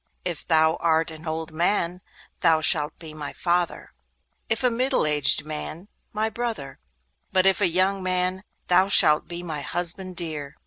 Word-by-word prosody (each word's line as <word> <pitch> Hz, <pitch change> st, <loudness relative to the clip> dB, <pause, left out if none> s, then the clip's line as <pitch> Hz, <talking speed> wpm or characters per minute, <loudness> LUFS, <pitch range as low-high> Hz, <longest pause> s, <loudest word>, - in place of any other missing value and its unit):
If 175 Hz, -4 st, -4 dB
thou 160 Hz, 0 st, +3 dB
art 165 Hz, 0 st, +1 dB
an 160 Hz, +1 st, -11 dB
old 160 Hz, 0 st, -4 dB
man, 175 Hz, +2 st, -1 dB, 0.4 s
thou 165 Hz, -2 st, +3 dB
shalt 155 Hz, -1 st, +2 dB
be 160 Hz, -2 st, -10 dB
my 150 Hz, -2 st, -7 dB
father; 175 Hz, -1 st, -2 dB, 0.6 s
if 225 Hz, +3 st, -1 dB
a 250 Hz, -, +3 dB
middle 255 Hz, -, +1 dB
aged 150 Hz, -1 st, +3 dB
man, 155 Hz, +5 st, -6 dB, 0.2 s
my 215 Hz, +1 st, -1 dB
brother; 220 Hz, -, -5 dB, 0.5 s
but 185 Hz, -1 st, +2 dB
if 195 Hz, -1 st, +2 dB
a -, -, +4 dB
young 190 Hz, +3 st, +1 dB
man, 185 Hz, +1 st, -1 dB, 0.2 s
thou 180 Hz, +2 st, +3 dB
shalt 155 Hz, -6 st, +5 dB
be 175 Hz, 0 st, -6 dB
my 155 Hz, -4 st, -5 dB
husband 175 Hz, +5 st, +1 dB
dear. 150 Hz, -4 st, -4 dB
170 Hz, 165 wpm, -24 LUFS, 155-185 Hz, 0.6 s, shalt